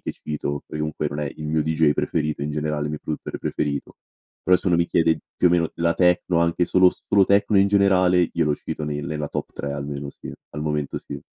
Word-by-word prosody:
che - - -4
cito, 70 -1 -4
perché 75 - -6
comunque 75 0 -2
non 75 +1 -5
è 75 -2 -3
il 75 - -6
mio 75 0 +1
deejay 80 -1 +2
preferito 75 0 -1
in 75 - -2
generale, 75 0 -2
il - - -2
mio 75 - -4
produttore 75 - -5
preferito. 70 -2 -3 0.5
Però 90 +1 +5
se 95 - -8
uno 90 - +3
mi 85 0 +2
chiede, 80 -2 +2 0.2
più - - +3
o - - +5
meno, 85 -2 +2
la 85 0 +1
techno, 90 -1 +2
anche 85 +1 +2
solo 90 +1 +5 0.2
solo 100 -1 +4
techno, 100 +2 +3
in 100 +1 +4
generale, 95 -3 +4
io - - +1
lo 75 -1 +1
cito - - -6
nel 75 -1 -3
nella 75 0 -3
top - - -5
3, 70 - -5
almeno, 70 0 -5
sì. - - -10 0.2
Al 75 - -5
momento, 75 -1 -2
sì. - - -8
75 Hz, 235 wpm, -23 LUFS, 75-90 Hz, 0.5 s, Però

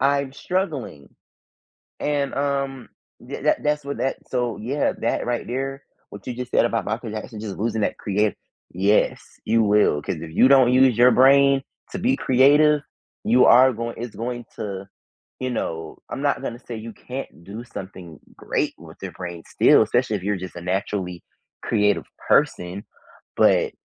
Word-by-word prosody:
I'm 140 0 +1
struggling." 150 - -3 0.9
And, 145 -2 -1
um, 140 -2 -2 0.4
th - - -7
tha - - +4
that's 150 -1 0
what 140 - -4
that 135 - -1
so, 125 -3 -1
yeah, 135 +7 -1
that 115 - 0
right 120 -1 -2
there, 135 +3 -4 0.3
what 100 -1 -11
you 125 - -3
just 125 0 -6
said - - +4
about 115 -1 -1
Michael 110 +1 -3
Jackson, 110 0 -7
just 105 -2 -6
losing 110 0 -1
that - - -1
creat 105 0 0 0.4
yes, 100 +4 +2 0.2
you 115 0 +3
will, 105 -8 +3
'cause 80 - -3
if 80 -1 -8
you 125 +10 +5
don't 130 -3 +6
use 130 -3 +5
your 125 +1 +7
brain 135 +2 +5 0.3
to 195 - -4
be 250 +7 +2
creative, 145 +3 +4 0.4
you 125 +3 +5
are 130 +2 +7
goin 115 +1 -4
it's 120 -1 -6
going 120 +1 -4
to, 100 -2 -5 0.5
you 130 - -2
know, 80 -8 -4
I'm - - -5
not 140 -1 +1
gonna 120 -3 -5
say 120 -2 -8
you 110 0 -8
can't 125 -9 -8
do 105 +5 -8
something 95 -7 -9 0.2
great - - -2
with - - -13
your - - -5
brain 85 -2 -7
still, - - +5
especially 115 +1 0
if 95 - -11
you're 105 0 0
just 90 -3 -8
a 85 - -7
naturally 90 -1 -3 0.4
creative 105 -2 +1 0.2
person, 90 +3 +1 0.5
but - - +3
120 Hz, 170 wpm, -23 LUFS, 105-135 Hz, 0.9 s, your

